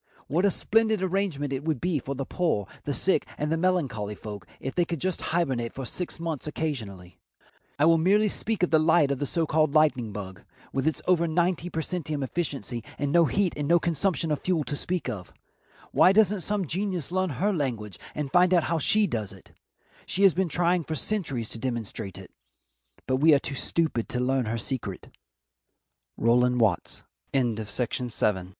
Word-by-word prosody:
What 175 +7 +1
a - - +5
splendid 220 +1 +1
arrangement 180 -7 -1
it 135 +1 -3
would 155 -4 -1
be 175 -1 0
for 135 +2 -5
the 135 0 -3
poor, 160 - 0 0.2
the 145 - -1
sick, 190 - +3
and 150 +1 -2
the - - +3
melancholy 140 - 0
folk 105 -2 -8
if 135 - -4
they 175 - +2
could 170 -2 -4
just 185 +1 -1
hibernate 135 -9 -1
for 135 - -5
six 175 +7 -4
months 165 -4 -3
occasionally. 105 - -5 0.6
I 145 - +4
will 165 0 +5
merely 205 +6 +4
speak 210 -1 0
of 180 - +2
the 160 - +5
light 155 -2 +4
of 140 - -1
the 145 - -1
so 165 +3 +1
called 155 -1 +1
lightning 130 -8 +3
bug, 95 -3 -7 0.3
with 135 +3 0
its 160 - -1
over 170 -2 +3
ninety 175 +1 0
per 160 - -2
centum 155 -5 -3
efficiency 130 -6 -3
and 145 -1 -1
no 170 +1 +5
heat 190 +3 +1
and 145 -1 -2
no 170 +2 +5
consumption 170 0 0
of 150 - 0
fuel 175 -4 0
to 145 - -4
speak 175 0 -2
of. 100 -8 -5 0.6
Why 185 - +6
doesn't 210 -2 +4
some 205 0 -1
genius 180 -1 -2
learn 185 0 +1
her 205 +3 +1
language 115 - -3 0.2
and 145 -3 -3
find 180 +1 +5
out 170 - +4
how 165 0 0
she 215 +7 +3
does 110 - -3
it? 95 -1 -15 0.6
She 195 - 0
has 195 -3 +7
been 185 -1 0
trying 175 +2 +2
for 155 - -4
centuries 145 - -2
to 115 - -7
demonstrate 115 -5 -4
it - - -11 0.7
but 130 0 +1
we 155 +2 +6
are - - +3
too 140 - -4
stupid 145 -3 0
to 125 - -1
learn 130 0 +1
her 115 +2 -2
secret. 115 -5 -4 1.1
Rowland 125 +1 +3
Watts. 105 -7 +1 0.3
THE 135 -2 +3
GREAT 110 -3 -2
TAILED 125 +3 -2
GRACKLE. 95 -4 +1
150 Hz, 195 wpm, -27 LUFS, 125-175 Hz, 1.1 s, has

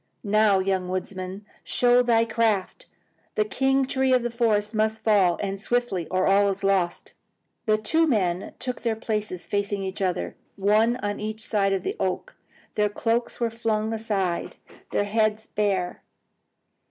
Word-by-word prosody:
Now, 210 -1 +4
young 190 -1 0
woodsman, 185 +1 -4 0.2
show 245 0 +4
thy 230 -2 +3
craft! 225 - 0 0.5
The 215 - +2
king 270 +5 +1
tree 265 0 +1
of 250 -1 +3
the 240 - -2
forest 220 -3 +1
must 220 0 0
fall, 195 -6 +4
and 195 0 -3
swiftly, 240 -7 0
or 185 0 +1
all 200 +1 +4
is 195 0 -3
lost!" 195 -3 0 0.5
The 215 0 +4
two 320 +10 +2
men 190 - 0
took 250 -1 -4
their 230 -2 0
places 210 -5 -3
facing 200 -1 -1
each 190 +1 -4
other, 185 -2 -1 0.2
one 215 +4 +3
on 205 0 -2
each 215 +1 -5
side 195 -2 +2
of 195 - 0
the 390 - -2
oak. - - -2 0.4
Their 210 -1 +1
cloaks 230 +3 -1
were 235 -1 0
flung 220 -1 -1
aside, 200 -6 -2 0.3
their - - +1
heads 215 +1 0
bare. 195 -4 -1
210 Hz, 155 wpm, -25 LUFS, 195-230 Hz, 0.5 s, Now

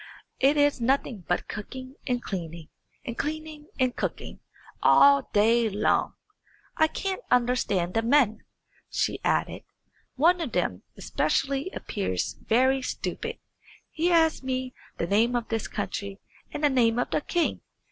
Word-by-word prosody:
It 280 +3 +4
is 290 -3 +3
nothing 235 -6 0
but 175 - -1
cooking 255 +5 -7
and 245 -1 -1
cleaning, 170 -4 -6 0.4
and 235 -4 -4
cleaning 310 +1 -5
and 255 -1 +1
cooking, - - -4 0.4
all 280 -1 +6
day 225 +2 +3
long. 210 +1 +1 0.6
I 315 - +4
can't 385 +6 -3
understand 235 -8 +1
the 225 - +2
men," 235 -2 +3 0.5
she - - -1
added; - - 0 0.5
"one 345 +6 +4
of 295 -7 -4
them - - -1 0.2
especially 275 +5 -1
appears 195 - -3
very 260 +4 +2
stupid. 460 - -4 0.5
He 335 +3 0
asked 320 -4 +3
me 255 -1 -3 0.2
the - - -1
name 225 +7 +2
of 235 -1 -2
this 225 -2 -2
country 200 0 -4 0.3
and 300 - -5
the 295 - +5
name 235 -3 +3
of 245 - -1
the - - +1
king. 340 +3 -1
255 Hz, 140 wpm, -26 LUFS, 220-290 Hz, 0.6 s, all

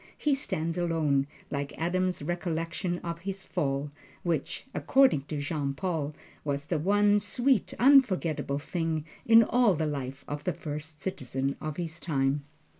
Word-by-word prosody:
He 295 - +2
stands 170 - -1
alone, 155 -5 +1 0.2
like 140 0 -3
Adam's 180 0 0
recollection 175 +1 -2
of 170 -1 -4
his 195 +1 -4
fall, 140 -2 -1 0.3
which 165 -5 -2
according 260 - +4
to 150 -1 -4
Jean 145 -2 -2
Paul 155 -4 -2 0.3
was 145 -1 -2
the 155 0 -1
one 205 +4 +4
sweet, 240 +2 +1
unforgetable 195 - +4
thing 160 0 -2 0.2
in 230 0 +8
all 230 -3 +3
the 160 0 0
life 135 -2 -4
of 145 0 -4
the 180 - 0
First 150 0 -6
Citizen 135 -6 -2
of 155 -1 -4
his 170 -1 -4
time. 140 -3 0
165 Hz, 145 wpm, -29 LUFS, 145-185 Hz, 0.3 s, in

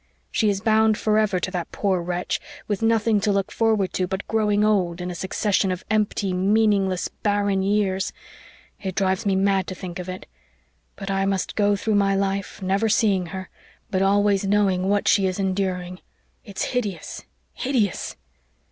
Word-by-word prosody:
She 215 - +2
is 200 -1 -1
bound 220 -1 +3
forever 215 -3 +2
to 185 - -3
that 175 -3 -4
poor 190 -3 0
wretch 175 +1 -2 0.3
with 205 -1 -2
nothing 225 -2 +2
to 210 0 +2
look 195 -1 0
forward 215 -5 +1
to 185 - 0
but 190 +1 -4
growing 210 -1 +2
old 185 -5 +1
in 180 0 -4
a - - -5
succession 190 +2 0
of 180 - -5
empty, 205 -3 0
meaningless, 195 -1 +2
barren 205 -2 0
years. 195 -1 0 0.7
It 190 -3 -4
drives 190 0 0
me 195 - +2
mad 195 -1 +2
to 185 - -5
think 180 -1 -7
of 180 0 -6
it. 185 0 -6 0.7
But 195 0 -5
I 195 0 +1
must 195 -1 -1
go 205 -1 +3
through 215 +2 -1
my 195 0 +2
life, 195 0 -2
never 195 +4 +1
seeing 200 -4 +2
her, 185 +2 -7 0.4
but 190 -1 +1
always 200 0 +3
knowing 195 -2 +2
what 205 0 +1
she 195 -2 +4
is 185 - -2
enduring. 185 -2 -2 0.4
It's 200 -3 -4
hideous 205 -10 -3 0.3
hideous!" 245 -7 -1
195 Hz, 170 wpm, -23 LUFS, 185-210 Hz, 0.7 s, she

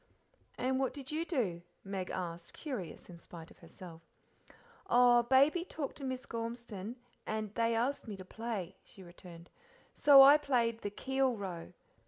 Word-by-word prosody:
"And 260 +1 0
what 265 0 -1
did 275 -1 -7
you 320 +2 -2
do?" 220 - -2 0.2
Meg 195 -2 -5
asked, 170 -1 -6
curious 230 - -7
in 175 -2 -12
spite 165 -1 -12
of - - -19
herself. 165 0 -12 0.9
"Oh, 245 0 +6
Baby 275 +8 +3
talked 310 -6 -6
to 280 - -9
Miss 260 -1 -4
Gormeston, 230 -2 -6 0.3
and 215 -1 -3
they 230 0 +1
asked 250 +3 -1
me 205 -3 -6
to 185 - -10
play," 215 -4 -5
she 195 - -15
returned, 175 -1 -13 0.4
"so 280 -2 +8
I 285 +2 +9
played 235 -6 0
the 205 - -3
'Keel 265 +3 -1
Row.' 180 -4 -7
230 Hz, 160 wpm, -33 LUFS, 185-265 Hz, 0.9 s, I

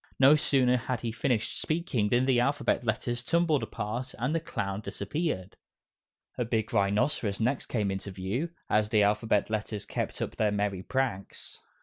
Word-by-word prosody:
No 135 +3 +7
sooner 130 -4 +3
had 125 0 -3
he 115 - -2
finished 120 -1 -1
speaking 155 -10 0
than 120 +3 +3
the 130 -2 +3
Alphabet 140 0 +1
Letters 120 +1 -1
tumbled 165 -2 +2
apart, 115 +3 -4
and 125 +6 0
the 165 - +2
clown 100 -10 -3
disappeared. 100 - -3 0.8
A - - +3
big 115 -2 -1
rhinoceros 100 +1 +2
next 125 +4 0
came 105 -5 0
into 95 +1 -4
view 100 - -2 0.2
as 105 0 +2
the 105 -2 +4
Alphabet 105 0 +2
Letters 105 -1 -2
kept - - -3
up - - -4
their 110 - +3
merry 100 -2 -1
pranks. 120 -4 -2
115 Hz, 160 wpm, -29 LUFS, 105-130 Hz, 0.8 s, No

